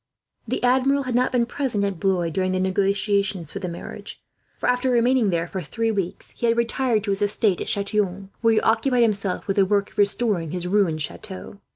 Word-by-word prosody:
The -, -, -2 dB
Admiral 265 Hz, +3 st, +3 dB
had 255 Hz, -1 st, -3 dB
not 250 Hz, +2 st, +2 dB
been 245 Hz, -2 st, +2 dB
present 240 Hz, -5 st, -2 dB
at 200 Hz, -4 st, -2 dB
Blois 185 Hz, -4 st, +1 dB
during 185 Hz, +2 st, 0 dB
the 185 Hz, -, 0 dB
negotiations 195 Hz, -2 st, 0 dB
for 195 Hz, -, -5 dB
the 190 Hz, -, -4 dB
marriage, 170 Hz, -, -8 dB, 0.4 s
for -, -, -2 dB
after 250 Hz, +1 st, +2 dB
remaining 245 Hz, -2 st, +3 dB
there 170 Hz, -1 st, 0 dB
for 190 Hz, +1 st, -4 dB
three 225 Hz, +8 st, -1 dB
weeks 195 Hz, -4 st, -4 dB
he 235 Hz, -, -2 dB
had 230 Hz, 0 st, +2 dB
retired 235 Hz, -2 st, +1 dB
to 205 Hz, -, -1 dB
his 195 Hz, +1 st, 0 dB
estate 205 Hz, -2 st, +2 dB
at -, -, -4 dB
Chatillon, 200 Hz, -1 st, -1 dB
where 225 Hz, -1 st, +4 dB
he -, -, +3 dB
occupied 240 Hz, +2 st, +2 dB
himself 200 Hz, -4 st, -1 dB
with 195 Hz, -, -2 dB
the 200 Hz, -, +6 dB
work 200 Hz, 0 st, +1 dB
of -, -, -10 dB
restoring 205 Hz, -4 st, +1 dB
his 180 Hz, +2 st, -3 dB
ruined 180 Hz, -6 st, +1 dB
chateau. 200 Hz, +4 st, -8 dB
205 Hz, 210 wpm, -23 LUFS, 190-235 Hz, 0.4 s, the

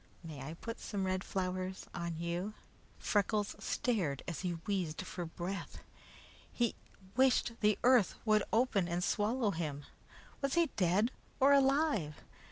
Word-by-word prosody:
May 155 Hz, -4 st, -7 dB
I 155 Hz, +5 st, -6 dB
put 230 Hz, +6 st, -6 dB
some 200 Hz, -3 st, -3 dB
red 185 Hz, 0 st, 0 dB
flowers 185 Hz, 0 st, -3 dB
on 170 Hz, -1 st, -3 dB
you?" 175 Hz, +5 st, -3 dB, 0.4 s
Freckles 205 Hz, 0 st, +1 dB
stared 190 Hz, -, -1 dB
as 170 Hz, -, -3 dB
he 180 Hz, -2 st, -1 dB
wheezed 185 Hz, -4 st, -1 dB
for 180 Hz, -1 st, -5 dB
breath. 180 Hz, +4 st, -5 dB, 0.7 s
He 240 Hz, -2 st, +1 dB, 0.4 s
wished 260 Hz, -2 st, +4 dB
the 210 Hz, -1 st, +3 dB
earth 245 Hz, -5 st, +5 dB
would 215 Hz, -1 st, +4 dB
open 220 Hz, -6 st, +2 dB
and 175 Hz, +1 st, -1 dB
swallow 215 Hz, +3 st, +1 dB
him. 150 Hz, -5 st, -3 dB, 0.6 s
Was 275 Hz, -1 st, 0 dB
he 340 Hz, -4 st, +3 dB
dead 195 Hz, +5 st, +3 dB, 0.3 s
or 275 Hz, +2 st, +6 dB
alive? 275 Hz, -, +3 dB
195 Hz, 140 wpm, -34 LUFS, 175-235 Hz, 0.7 s, or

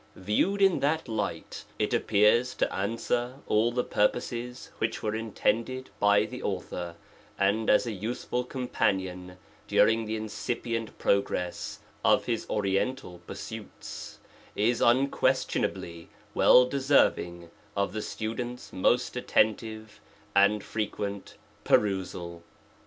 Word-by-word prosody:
VieWed 110 Hz, -, +1 dB
in 195 Hz, -2 st, +4 dB
that 155 Hz, +2 st, 0 dB
light 110 Hz, -1 st, -4 dB
it -, -, 0 dB
appears 110 Hz, +5 st, +3 dB
to -, -, 0 dB
answer 115 Hz, +5 st, -1 dB
all 110 Hz, +3 st, +2 dB
the 125 Hz, +1 st, 0 dB
purposes 120 Hz, +3 st, -1 dB
which 110 Hz, 0 st, -2 dB
were 110 Hz, -1 st, 0 dB
intended 115 Hz, +3 st, -1 dB
by 105 Hz, +1 st, +4 dB
the 125 Hz, +2 st, -7 dB
author, 90 Hz, -3 st, -4 dB, 0.4 s
and 100 Hz, +3 st, +1 dB
as 105 Hz, -, +5 dB
a 115 Hz, -, -2 dB
useful 115 Hz, +4 st, -3 dB
companion 95 Hz, -8 st, -2 dB, 0.3 s
during 115 Hz, 0 st, +4 dB
the 110 Hz, +1 st, -2 dB
incipient 115 Hz, +1 st, -3 dB
progress 90 Hz, -3 st, -1 dB, 0.2 s
of -, -, +4 dB
his 115 Hz, -2 st, -2 dB
oriental 100 Hz, 0 st, -1 dB
pursuits, -, -, -8 dB, 0.4 s
is 115 Hz, +3 st, +1 dB
unquestionably 125 Hz, -9 st, +1 dB, 0.2 s
well 125 Hz, -, +7 dB
deserving 125 Hz, -11 st, +1 dB, 0.3 s
of 100 Hz, 0 st, 0 dB
the 110 Hz, -, -2 dB
student's 120 Hz, +4 st, -5 dB
most 120 Hz, +7 st, +1 dB
attentive 110 Hz, -3 st, 0 dB, 0.3 s
and 100 Hz, +1 st, +4 dB
fre 110 Hz, -, -3 dB
quent 100 Hz, -1 st, -4 dB, 0.3 s
perusal. 90 Hz, -4 st, 0 dB
110 Hz, 115 wpm, -28 LUFS, 100-125 Hz, 0.4 s, well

